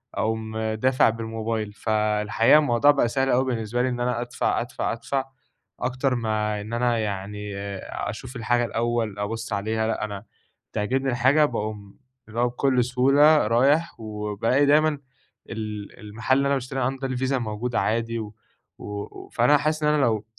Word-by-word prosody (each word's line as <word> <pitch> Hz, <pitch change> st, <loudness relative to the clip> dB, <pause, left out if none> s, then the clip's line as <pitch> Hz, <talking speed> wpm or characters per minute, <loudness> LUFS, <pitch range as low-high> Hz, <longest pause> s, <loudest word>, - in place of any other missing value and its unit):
أقوم 110 Hz, +1 st, -2 dB
دافع 110 Hz, +4 st, +2 dB
بالموبايل. 110 Hz, -1 st, -3 dB
فالحقيقة 110 Hz, +3 st, +3 dB
الموضوع 145 Hz, 0 st, +4 dB
بقى 140 Hz, -4 st, +2 dB
سهل 135 Hz, +3 st, 0 dB
أوي 130 Hz, +1 st, +3 dB
بالنسبة 120 Hz, -1 st, -1 dB
لي 130 Hz, -, +1 dB
إن 120 Hz, -1 st, -3 dB
أنا 120 Hz, -1 st, 0 dB
أدفع، 120 Hz, 0 st, -1 dB
أدفع، -, -, -3 dB
أدفع، 135 Hz, -1 st, -2 dB, 0.5 s
أكتر 130 Hz, +1 st, 0 dB
ما 105 Hz, -2 st, -1 dB
إن 110 Hz, +3 st, -8 dB
أنا 120 Hz, 0 st, +1 dB
يعني 105 Hz, -1 st, -4 dB, 0.5 s
أشوف 120 Hz, +5 st, -7 dB
الحاجة 120 Hz, +1 st, +1 dB
الأوّل 115 Hz, -3 st, -1 dB
أبص 115 Hz, +2 st, -3 dB
عليها، 110 Hz, +2 st, -1 dB
لأ، 110 Hz, -, -1 dB
أنا 100 Hz, 0 st, -7 dB, 0.5 s
بتعجبني 130 Hz, +6 st, 0 dB
الحاجة 130 Hz, +5 st, +4 dB
باقوم 105 Hz, -5 st, -5 dB, 0.3 s
اللي 110 Hz, +1 st, -5 dB
هو 120 Hz, -, +3 dB
بكل 125 Hz, 0 st, +1 dB
سهولة 135 Hz, +3 st, +4 dB
رايح، 140 Hz, +7 st, +2 dB
وبالاقي 110 Hz, +5 st, 0 dB
دايمًا 150 Hz, 0 st, +3 dB, 0.5 s
ال 105 Hz, -2 st, -6 dB
المحل 110 Hz, +5 st, 0 dB
اللي 140 Hz, -, +2 dB
أنا 140 Hz, -, +2 dB
باشتري 135 Hz, 0 st, -4 dB
عنده 135 Hz, +1 st, -1 dB
ده 130 Hz, -, -3 dB
الفيزا 130 Hz, +1 st, 0 dB
موجودة 115 Hz, +1 st, -2 dB
عادي، 115 Hz, +1 st, -1 dB
و 105 Hz, -1 st, -7 dB, 0.4 s
و 105 Hz, 0 st, -7 dB
فأنا 125 Hz, +5 st, +5 dB
حاسس 155 Hz, +2 st, -1 dB
إن 150 Hz, -, +4 dB
أنا 150 Hz, -, +2 dB
لو 110 Hz, -5 st, +1 dB
115 Hz, 160 wpm, -24 LUFS, 110-130 Hz, 0.5 s, فأنا